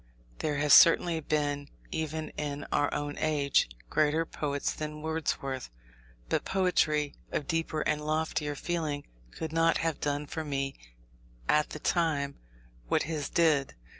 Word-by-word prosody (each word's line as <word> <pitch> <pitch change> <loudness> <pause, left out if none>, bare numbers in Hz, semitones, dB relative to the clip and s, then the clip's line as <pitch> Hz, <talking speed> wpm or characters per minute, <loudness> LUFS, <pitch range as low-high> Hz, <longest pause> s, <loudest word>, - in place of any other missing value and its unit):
There 150 -2 -1
have 145 0 +4
certainly 165 0 +7
been, 145 -2 -1 0.2
even 160 0 -3
in 145 -1 -4
our 145 - +2
own 145 0 -3
age, 145 - +2 0.2
greater 155 +2 +2
poets 145 -3 -2
than 150 0 -6
Wordsworth; 145 - -2 0.6
but - - 0
poetry 155 -6 +1 0.2
of 145 - -1
deeper 165 0 -1
and 150 0 0
loftier 155 -1 -1
feeling 155 -3 -2 0.2
could 160 - -6
not 165 0 +4
have 165 -3 -1
done 145 0 -1
for 160 +2 -4
me 135 -2 -2 0.7
at 150 0 +3
that 155 - -8
time 150 -5 +1 0.5
what - - +2
his 150 -2 -3
did. 155 -5 +2
150 Hz, 135 wpm, -30 LUFS, 145-160 Hz, 0.7 s, certainly